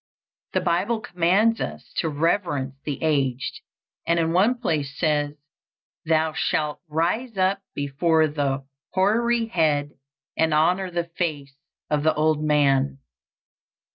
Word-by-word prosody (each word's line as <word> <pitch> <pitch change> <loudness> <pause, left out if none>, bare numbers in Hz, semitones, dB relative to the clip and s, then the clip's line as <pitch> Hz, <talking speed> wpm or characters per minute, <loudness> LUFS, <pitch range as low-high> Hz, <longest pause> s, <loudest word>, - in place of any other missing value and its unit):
The - - +1
Bible 195 +7 +1
commands 205 +2 +2
us - - -6
to 165 - +1
reverence 150 -3 0
the 145 -3 -2
aged, 135 -5 0 0.5
and 170 0 +3
in 165 0 +1
one 205 +8 +4
place 150 - -2
says, 150 -3 0 0.7
"Thou 160 0 +2
shalt 150 -1 -1
rise 180 +9 -1
up 190 +1 +2
before 155 +3 +2
the 140 -2 -2 0.3
hoary 230 +5 +2
head, 150 -8 +1 0.4
and 160 -1 +2
honor 180 +5 +2
the 175 -1 -1 0.2
face 145 -6 -2 0.4
of 150 -1 +2
the 160 +1 +2
old 155 0 +1
man." 140 -3 +2
160 Hz, 125 wpm, -24 LUFS, 145-185 Hz, 0.7 s, one